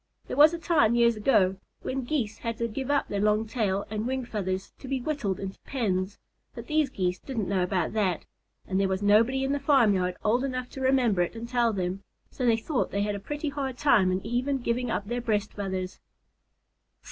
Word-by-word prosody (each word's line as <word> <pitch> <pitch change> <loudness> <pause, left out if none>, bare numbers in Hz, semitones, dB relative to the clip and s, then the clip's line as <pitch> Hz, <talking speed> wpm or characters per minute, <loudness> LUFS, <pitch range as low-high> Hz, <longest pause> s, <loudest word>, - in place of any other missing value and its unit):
There - - -5
was 300 +3 +8
a 340 - -3
time, 305 -9 +3
years 235 -1 +4
ago, 205 -4 +3 0.3
when 260 -1 -3
Geese 230 -7 -2
had 230 -2 -3
to 235 -1 -1
give 260 +4 -5
up 285 -1 +2
their 200 - -2
long 210 +1 +2
tail 205 -4 -1
and 215 +2 -2
wing 260 -1 -2
feathers 190 -4 -3
to 270 - -9
be 270 0 -1
whittled 245 -9 -2
into 195 0 -6
pens, 200 -6 -2 0.4
but - - -7
these 305 -2 +1
Geese 180 -6 -1
didn't 230 -8 -3
know 190 -1 +1
about 180 -1 0
that, 195 -6 0 0.4
and 190 0 -1
there 195 - +2
was 190 +1 -2
nobody 230 +6 +4
in 270 - 0
the 285 - 0
farmyard 210 -11 +3
old 240 +4 +2
enough 255 -2 -3
to 265 - -7
remember 255 -8 +3
it 175 - -1
and 230 +1 -6
tell 240 -1 +2
them, 185 -1 -2 0.3
so 250 - -2
they 230 -1 +4
thought 250 +4 -1
they 200 0 -1
had 205 0 -1
a 200 - -4
pretty 295 +8 -4
hard 275 -3 -4
time 215 -11 +4
in 185 +2 -2
even 250 +5 0
giving 245 0 -1
up 205 - -1
their 240 +2 -2
breast 215 -3 -1
feathers. 190 -2 -4
225 Hz, 215 wpm, -27 LUFS, 195-260 Hz, 0.4 s, was